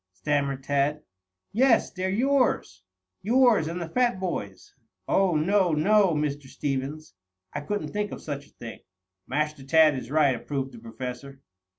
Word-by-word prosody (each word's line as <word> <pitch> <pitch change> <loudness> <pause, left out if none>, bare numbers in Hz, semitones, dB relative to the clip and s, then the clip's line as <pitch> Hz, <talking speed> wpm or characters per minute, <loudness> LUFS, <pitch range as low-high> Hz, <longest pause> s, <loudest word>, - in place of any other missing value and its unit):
stammered 140 +2 -1
Tad. 145 +2 0 0.5
"Yes. 240 +1 +3
They're 185 0 -3
yours, 245 - +1 0.4
yours 235 -6 +4
and 170 +2 -4
the 170 - -4
fat 245 +3 +1
boy's." 135 - -5 0.3
"Oh, 190 -3 +2
no, 180 +2 +2
no, 195 +3 +3
Mr. 145 -2 -2
Stevens! 140 +3 -4 0.4
I - - -3
couldn't 205 +8 -3
think 210 -1 -2
of - - -6
such 145 -1 -6
a - - -27
thing." 115 -1 -9 0.5
"Master 150 0 -2
Tad 155 +1 +5
is 125 -2 -6
right," 145 -2 +3
approved 135 +2 -4
the 120 - -12
Professor. 125 +4 -8
150 Hz, 150 wpm, -26 LUFS, 135-190 Hz, 0.5 s, Tad